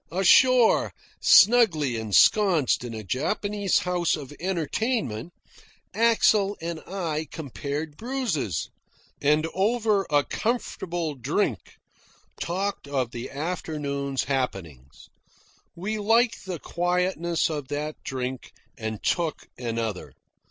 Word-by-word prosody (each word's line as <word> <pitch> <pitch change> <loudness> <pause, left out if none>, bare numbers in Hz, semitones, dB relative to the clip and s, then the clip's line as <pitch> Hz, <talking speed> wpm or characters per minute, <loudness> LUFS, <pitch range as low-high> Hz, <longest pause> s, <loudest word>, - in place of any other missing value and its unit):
Ashore, 230 +7 +5 0.3
snugly 190 - +5
ensconced 140 - +3
in 120 -2 -6
a 110 - -6
Japanese 200 - 0
house 180 -2 +1
of 145 -3 -8
entertainment, 175 - -2 0.6
Axel 215 -2 +3
and 165 0 -4
I 165 -5 -3
compared 145 +1 -5
bruises, 220 - -2 0.5
and 150 +2 +3
over 210 -1 +1
a 145 -1 +3
comfortable 175 - -2
drink 130 -4 -2 0.7
talked 195 -1 -2
of 130 -4 -1
the 120 +1 -6
afternoon's 140 -3 -3
happenings. 85 - -4 0.7
We 210 +5 -3
liked 225 0 +2
the 180 -2 -3
quietness 175 0 0
of 150 -4 -4
that 150 +2 -4
drink 130 -1 -5 0.3
and 110 -1 -5
took 165 -4 -1
another. 115 -5 -3
160 Hz, 100 wpm, -25 LUFS, 135-195 Hz, 0.7 s, Ashore